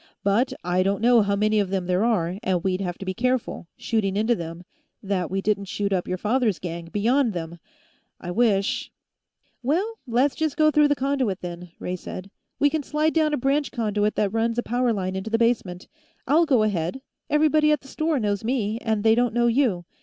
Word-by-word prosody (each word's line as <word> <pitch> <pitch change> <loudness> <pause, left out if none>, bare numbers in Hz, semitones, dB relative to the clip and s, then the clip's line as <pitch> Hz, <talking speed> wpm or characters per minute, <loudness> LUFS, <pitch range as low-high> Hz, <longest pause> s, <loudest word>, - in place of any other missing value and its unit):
"But 210 +6 +2
I 180 +1 +1
don't 195 +1 +1
know 240 -1 +6
how 200 -1 +1
many 215 +1 +2
of 200 -2 0
them 190 -2 -1
there 180 +3 +1
are, 190 -6 0
and 180 -2 0
we'd 190 0 0
have 175 -2 -3
to 195 - -8
be 190 - -2
careful, 250 -4 -1
shooting 200 -4 -1
into 220 +3 +2
them, 170 -3 -6 0.4
that 190 -4 -1
we 195 +1 -2
didn't 200 -1 0
shoot 200 -1 -2
up 180 -2 -1
your 185 - -2
father's 220 0 +1
gang, 170 -1 -6
beyond 230 +7 +1
them. 170 -1 -6 0.6
I 175 - -6
wish 200 -2 +1 0.4
" - - -46
"Well, 370 - -1
let's 275 +5 +1
go 310 -1 +4
through 300 -1 +5
the 290 - +2
conduit, 260 -7 -1
then," 175 0 -7
Ray 180 - -4
said. 185 +2 -8 0.3
"We 290 - +4
can 315 - 0
slide 305 +2 0
down 315 -2 +2
a 295 - 0
branch 275 +3 0
conduit 210 -3 0
that 205 -1 0
runs 230 +1 0
a 240 - 0
power 245 +1 +1
line 190 -3 -2
into 190 +3 -4
the 225 - +2
basement. 225 -6 0 0.4
I'll 320 +5 +3
go 255 -7 +4
ahead; 205 +4 -2 0.3
everybody 305 0 +3
at 300 - +1
the 270 - -15
store 310 +1 -1
knows 205 -2 -1
me, 225 -2 -1
and 220 -3 -1
they 220 0 +5
don't 240 0 +1
know 240 0 +3
you. 235 -8 +1
220 Hz, 210 wpm, -24 LUFS, 190-255 Hz, 0.6 s, know